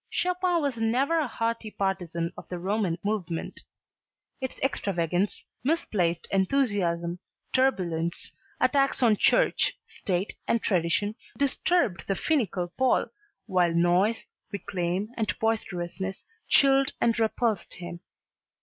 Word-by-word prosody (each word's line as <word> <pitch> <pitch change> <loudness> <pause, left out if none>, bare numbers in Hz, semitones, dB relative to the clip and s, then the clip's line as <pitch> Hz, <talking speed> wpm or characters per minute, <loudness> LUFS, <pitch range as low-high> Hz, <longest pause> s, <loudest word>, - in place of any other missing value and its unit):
Chopin 360 -2 +1
was 275 -4 -1
never 255 +9 +2
a 300 - 0
hearty 230 -1 -2
partisan 175 -4 -2
of - - -11
the 180 - -4
Romantic 190 -1 -1
movement. 180 -6 -2 0.8
Its 260 - -4
extravagance, 185 - 0 0.2
misplaced 200 - 0
enthusiasm, 190 -6 +1 0.3
turbulence, 175 -11 0 0.3
attacks 275 -2 +2
on 225 -3 +5
church, - - +3
state 190 0 -2
and 230 - +1
tradition 185 +3 +1 0.2
disturbed 280 - +1
the 195 - +1
finical 200 - 0
Pole 260 0 +3 0.4
while 180 -4 +2
noise, 180 +6 +3 0.3
reclame 190 0 -2
and 220 -2 -1
boisterousness 190 -4 -2 0.2
chilled 275 0 +5
and 230 -1 +2
repulsed 220 -2 0
him. 175 -1 -7
205 Hz, 110 wpm, -27 LUFS, 175-250 Hz, 0.8 s, on